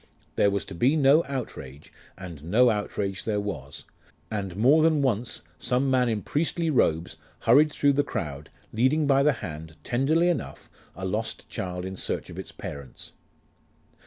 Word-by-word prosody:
There 100 - +4
was 100 0 -1
to - - -9
be 125 - +2
no 150 +2 +5
outrage, 75 - -7 0.2
and 85 -6 -9
no 115 +9 +4
outrage 100 -2 -3
there 105 -2 -1
was: 75 -9 -6 0.5
and 100 -4 -3
more 135 +9 +5
than 155 -2 +3
once 120 -2 -1 0.2
some 130 +2 +1
man 125 -2 +3
in 110 -3 -2
priestly 165 +2 0
robes 80 - +1 0.2
hurried 145 +6 +5
through 145 -1 +2
the 145 +1 +2
crowd, 75 - -5 0.2
leading 130 +7 +2
by 140 -1 +4
the 150 +2 +4
hand, 80 -2 -8
tenderly 150 +8 +2
enough, 175 - -3 0.2
a 95 - -5
lost 110 +4 -3
child 90 0 -4
in 95 0 -5
search - - -4
of - - -8
its - - -7
parents. 70 -3 -9
110 Hz, 160 wpm, -26 LUFS, 90-140 Hz, 0.5 s, no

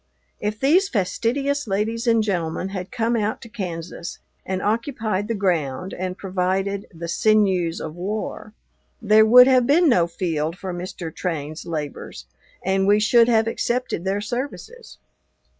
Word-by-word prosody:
If 210 +1 -3
these 355 +9 +3
fastidious 265 +7 -1
ladies 220 +4 -1
and 230 -1 +4
gentlemen 180 -2 -2
had 185 -2 -6
come 230 0 0
out 215 -1 -1
to 235 - -11
Kansas 170 -5 -6 0.3
and 190 0 -1
occupied 220 -1 -1
the 230 - -1
ground 180 -3 -1
and 185 0 -4
provided 190 +1 -1
"the 170 -1 -7
sinews 185 -2 +2
of 155 - -6
war," 210 +3 -5 0.4
there 220 0 +5
would 250 +3 +9
have 255 -2 +4
been 335 +4 +4
no 180 - +4
field 165 -1 -2
for 185 -1 -5
Mr. 175 -2 -6
Train's 155 -2 -4
labors, 150 - -5 0.4
and 190 +1 +1
we 205 +1 +5
should 230 +2 +5
have 225 -2 +3
accepted 240 -5 -2
their 195 +2 -1
services. 280 - -6
200 Hz, 145 wpm, -22 LUFS, 180-230 Hz, 0.4 s, would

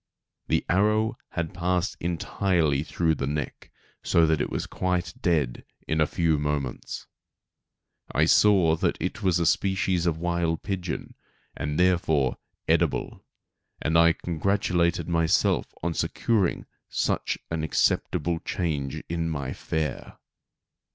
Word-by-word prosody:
The - - +1
arrow 105 +4 +2 0.2
had 85 -2 -3
passed 90 +1 0
entirely 85 -3 0
through 80 +1 0
the 70 -3 -3
neck, 75 -1 -4 0.3
so 85 -1 +3
that 80 -2 +2
it - - -1
was - - -3
quite 90 -2 -2
dead 75 -9 0 0.2
in 80 0 +1
a 80 - +4
few 80 -3 +1
moments. 75 -3 -3 1.1
I 75 - +3
saw 90 -2 +5
that - - 0
it 95 +6 -3
was 95 -3 +2
a 85 - +1
species 95 0 +1
of 80 -2 +1
wild 85 -1 -1
pigeon, 90 -4 -4 0.4
and 75 +1 -3
therefore 80 -7 +2 0.3
edible; - - 0 0.6
and 80 - -1
I 85 0 +6
congratulated 90 +1 0
myself 85 -2 +2 0.2
on 85 0 0
securing 100 +1 0 0.2
such - - 0
an 80 -2 -1
acceptable 80 +1 +1
change 75 -7 -3
in 85 0 -2
my 70 -4 -3
fare. 80 -1 -4
85 Hz, 125 wpm, -26 LUFS, 80-90 Hz, 1.1 s, I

